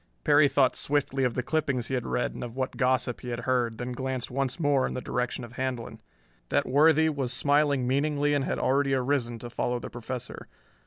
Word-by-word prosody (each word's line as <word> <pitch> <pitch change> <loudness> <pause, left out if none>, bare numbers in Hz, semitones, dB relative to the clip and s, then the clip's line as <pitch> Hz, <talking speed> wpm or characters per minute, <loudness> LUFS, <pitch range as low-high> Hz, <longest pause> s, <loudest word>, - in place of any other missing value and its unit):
Perry 145 0 +5
thought 135 -2 +3
swiftly 140 -2 0
of 125 -3 0
the 125 - -1
clippings 140 -5 0
he - - -3
had 125 -2 -1
read 125 - -1
and - - -6
of 120 -1 -7
what 130 0 -2
gossip 125 -2 0
he 125 - -6
had 120 -1 -3
heard, 120 -3 0
then 125 +1 -4
glanced 130 0 -3
once 135 +3 -2
more 145 -4 +2
in - - -5
the - - -2
direction 125 -1 -3
of 120 +1 -11
Handlon. 125 -4 -4 0.5
That - - +2
worthy 160 +4 +4
was 140 -5 -1
smiling 145 -1 +2
meaningly 145 +2 +1
and 145 -2 +1
had - - -2
already 135 0 +2
arisen 125 -2 0
to 120 +1 -8
follow 125 +1 -1
the - - -7
Professor. 125 +1 -6
130 Hz, 210 wpm, -27 LUFS, 125-145 Hz, 0.5 s, Perry